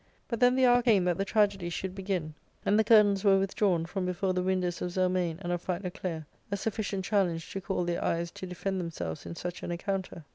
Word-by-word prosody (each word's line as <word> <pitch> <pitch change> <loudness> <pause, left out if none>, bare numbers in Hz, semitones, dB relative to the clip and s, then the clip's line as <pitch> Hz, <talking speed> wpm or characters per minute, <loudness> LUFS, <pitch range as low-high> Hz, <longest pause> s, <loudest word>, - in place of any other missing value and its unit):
But 235 - -3
then 250 0 +5
the 260 0 +4
hour 245 0 +5
came 220 -6 +4
that 175 -1 0
the 195 - +1
tragedy 200 -4 +1
should 185 +2 -4
begin, 185 -5 -3 0.3
and 205 +2 +4
the - - +5
curtains 210 -3 +5
were 195 -2 +6
withdrawn 190 -3 +1
from 185 +2 -3
before 185 +1 0
the 180 - 0
windows 180 -1 -1
of 180 - -1
Zelmane 180 -2 0
and 175 - -2
of 175 - -2
Philoclea, 180 -3 -4 0.2
a 200 - -1
sufficient 200 -2 -2
challenge 180 -5 0
to 195 - -3
call 190 -1 -1
their 175 0 -1
eyes 170 0 -1
to 185 - -7
defend 190 +1 -3
themselves 85 - -5
in - - -6
such 175 +1 -5
an - - -4
encounter. 180 -2 -3
185 Hz, 220 wpm, -29 LUFS, 175-200 Hz, 0.3 s, were